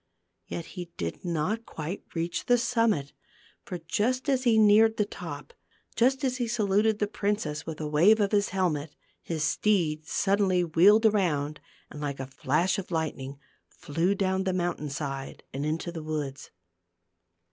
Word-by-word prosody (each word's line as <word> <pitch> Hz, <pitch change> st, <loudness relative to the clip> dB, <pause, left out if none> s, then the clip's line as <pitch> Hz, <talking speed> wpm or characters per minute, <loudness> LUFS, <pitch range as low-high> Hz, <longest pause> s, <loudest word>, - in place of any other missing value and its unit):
Yet 170 Hz, -, -5 dB
he 180 Hz, -2 st, -7 dB
did 85 Hz, -1 st, -4 dB
not 175 Hz, +7 st, -2 dB
quite 160 Hz, +5 st, -5 dB
reach 170 Hz, +1 st, -2 dB
the 245 Hz, -, +5 dB
summit; 230 Hz, -, +1 dB, 0.5 s
for 180 Hz, -, -5 dB
just 240 Hz, -, -1 dB
as 260 Hz, -1 st, +1 dB
he 230 Hz, -2 st, +5 dB
neared 220 Hz, +1 st, +6 dB
the 210 Hz, -, +2 dB
top, 475 Hz, -, -8 dB, 0.4 s
just 260 Hz, +3 st, +2 dB
as 255 Hz, -1 st, 0 dB
he 240 Hz, -2 st, -1 dB
saluted 215 Hz, -1 st, +2 dB
the 210 Hz, -, +1 dB
princess 200 Hz, -8 st, -2 dB
with 160 Hz, -1 st, -5 dB
a 155 Hz, -, -3 dB
wave 175 Hz, +9 st, +5 dB
of 200 Hz, -2 st, +1 dB
his 205 Hz, -1 st, +2 dB
helmet, 160 Hz, -6 st, -1 dB, 0.3 s
his 160 Hz, -3 st, -3 dB
steed 160 Hz, -6 st, +1 dB
suddenly 195 Hz, -2 st, +2 dB
wheeled 195 Hz, +7 st, +5 dB
around 155 Hz, -9 st, +1 dB, 0.3 s
and 150 Hz, -, -8 dB
like 140 Hz, -2 st, -3 dB
a 135 Hz, -, -3 dB
flash 150 Hz, +9 st, 0 dB
of 190 Hz, -, -7 dB
lightning, 145 Hz, -5 st, -3 dB, 0.3 s
flew 170 Hz, +7 st, -1 dB
down 190 Hz, -1 st, 0 dB
the 190 Hz, -1 st, 0 dB
mountain 175 Hz, -4 st, -2 dB
side 135 Hz, -1 st, -5 dB
and 140 Hz, +3 st, -2 dB
into 165 Hz, +3 st, -2 dB
the 165 Hz, -2 st, -6 dB
woods. 150 Hz, -3 st, -4 dB
180 Hz, 160 wpm, -28 LUFS, 155-210 Hz, 0.5 s, neared